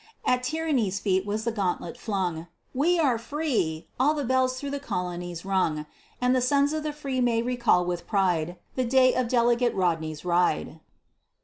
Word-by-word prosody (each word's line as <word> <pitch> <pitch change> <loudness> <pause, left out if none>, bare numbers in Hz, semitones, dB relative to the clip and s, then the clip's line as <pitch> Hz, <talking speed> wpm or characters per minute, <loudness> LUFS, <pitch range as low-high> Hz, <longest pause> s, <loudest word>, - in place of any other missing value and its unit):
At 250 0 +2
Tyranny's 255 -8 0
feet 190 -1 0
was 210 +2 -2
the 230 - 0
gauntlet 200 0 -2
flung; 185 -8 -3 0.3
"We 330 +7 +2
are 265 -8 +2
free!" 230 - -2
all 295 +4 +3
the 290 - -2
bells 255 +1 +1
through 280 0 -5
the 285 - -3
colonies 175 -6 -4
rung, 175 -6 0 0.3
And 250 +1 +2
the 255 - +2
sons 280 +3 +2
of 310 - -1
the 305 0 -2
free 275 -3 -3
may 235 -2 +2
recall 240 -7 +2
with 175 -1 -3
pride 180 -4 +1 0.2
The 255 - 0
day 255 +1 +4
of 255 -1 0
Delegate 240 0 +2
Rodney's 160 -4 -1
ride. 175 - +1
235 Hz, 175 wpm, -26 LUFS, 180-260 Hz, 0.3 s, day